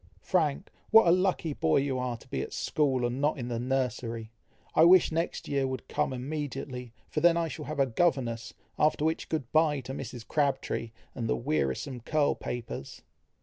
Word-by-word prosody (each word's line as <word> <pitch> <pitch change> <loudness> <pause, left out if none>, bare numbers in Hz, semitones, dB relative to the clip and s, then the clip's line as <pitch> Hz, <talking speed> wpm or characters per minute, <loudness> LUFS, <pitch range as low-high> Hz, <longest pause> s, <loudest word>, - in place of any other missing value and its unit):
"Frank! 165 -2 0 0.2
what 225 0 +8
a - - +7
lucky 180 -3 +1
boy 80 - +2
you 135 -2 0
are 125 -2 -2
to - - -18
be - - -2
at - - -6
school, 135 -5 +1
and 120 +3 -2
not 150 +1 +2
in 120 -2 -4
the 120 -1 -2
nursery! 120 -3 -2 0.4
I 160 - +6
wish 180 +1 +7
next 165 +2 -2
year 140 -2 +1
would 130 -2 -5
come 150 -2 0
immediately, 130 -2 -5 0.2
for - - -2
then 170 0 +5
I 170 -1 +1
shall 155 -1 -6
have 155 -1 -5
a 135 - +5
governess, 120 -4 0 0.2
after 150 0 +3
which 160 0 -1
good 145 -7 -3
bye 155 -2 +3
to 130 +1 -7
Mrs. 120 -4 -7
Crabtree, 140 -5 0 0.2
and 115 -2 -3
the - - +2
wearisome 125 - -1
curl 145 +5 +1
papers." 115 - -6
135 Hz, 190 wpm, -29 LUFS, 120-155 Hz, 0.4 s, what